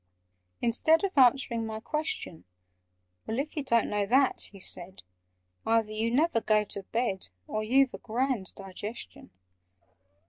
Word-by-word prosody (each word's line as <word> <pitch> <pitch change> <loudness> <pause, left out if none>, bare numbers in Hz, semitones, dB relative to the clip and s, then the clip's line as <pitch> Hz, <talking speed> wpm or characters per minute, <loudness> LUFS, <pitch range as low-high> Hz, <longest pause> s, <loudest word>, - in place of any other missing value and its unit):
Instead 315 - +4
Of 390 -1 -1
answering 250 -3 +4
my 220 -1 -4
question, 305 - -4 0.8
"Well, 220 - -2
if 285 +3 -3
you 300 - -1
don't 235 -4 +2
know 205 -1 -1
that," 265 +3 +3
he 200 - -13
said, 185 0 -4 0.6
"Either 225 -1 +2
you 220 +2 -1
never 265 -1 +2
go 215 -1 +3
to 200 -1 -6
bed, 200 -1 -2 0.2
Or 215 - -3
you've 260 +4 +3
a - - -7
grand 240 -3 -2
digestion! 195 - -8
230 Hz, 140 wpm, -29 LUFS, 210-265 Hz, 0.8 s, Instead